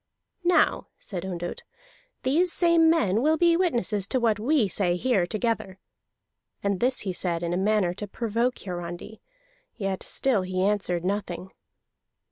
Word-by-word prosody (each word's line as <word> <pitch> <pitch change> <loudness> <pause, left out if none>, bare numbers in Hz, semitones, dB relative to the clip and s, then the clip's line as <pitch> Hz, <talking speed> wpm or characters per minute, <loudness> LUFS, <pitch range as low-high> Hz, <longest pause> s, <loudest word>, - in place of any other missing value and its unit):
"Now," 355 +1 +3
said 180 -5 -6
Ondott, 175 -1 -5 0.6
"these 325 +7 +2
same 335 -2 +4
men 230 - +2
will 310 +3 +3
be 340 +1 +4
witnesses 235 - 0
to 255 - 0
what 225 -3 +2
we 250 0 +2
say 180 -1 +1
here 195 -3 +1
together." 215 -3 -2 0.9
And 200 -2 0
this 250 +1 +1
he 190 -2 -3
said 175 -1 -1
in 170 0 -1
a - - 0
manner 195 -2 +2
to 205 +3 -6
provoke 235 +4 -1
Hiarandi, 175 +3 -7 0.5
yet 195 -3 -3
he - - -6
still 255 -7 +1
answered 185 -1 0
nothing. 190 -2 -3
205 Hz, 145 wpm, -26 LUFS, 185-255 Hz, 0.9 s, same